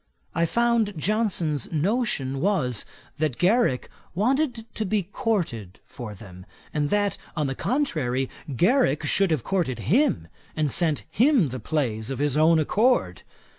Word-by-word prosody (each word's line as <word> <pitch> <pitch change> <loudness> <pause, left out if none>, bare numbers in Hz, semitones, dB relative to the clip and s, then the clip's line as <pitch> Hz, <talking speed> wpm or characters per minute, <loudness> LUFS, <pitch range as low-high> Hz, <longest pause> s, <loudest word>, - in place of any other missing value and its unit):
I 170 0 +1
found 235 -3 +1
Johnson's 180 - 0
notion 160 - 0
was, 150 - 0 0.3
that 150 -5 0
Garrick 185 - +2 0.3
wanted 245 - 0
to 220 - -2
be 210 0 0
courted 170 - -3
for 120 -6 -8
them, 90 -3 -12 0.3
and 145 -1 0
that, 205 -1 0 0.2
on 150 - +1
the 135 - -1
contrary, 135 - -1 0.3
Garrick 170 - +2
should 195 +5 +2
have 155 -7 0
courted 175 - -1 0.2
him, 280 +2 +2 0.3
and 150 -3 0
sent 160 -2 +1
him 245 - +3
the 130 +1 -5
plays 115 -5 -2
of 135 - -3
his 145 0 0
own 160 +2 +5
accord. 220 - +2
165 Hz, 140 wpm, -25 LUFS, 135-215 Hz, 0.3 s, own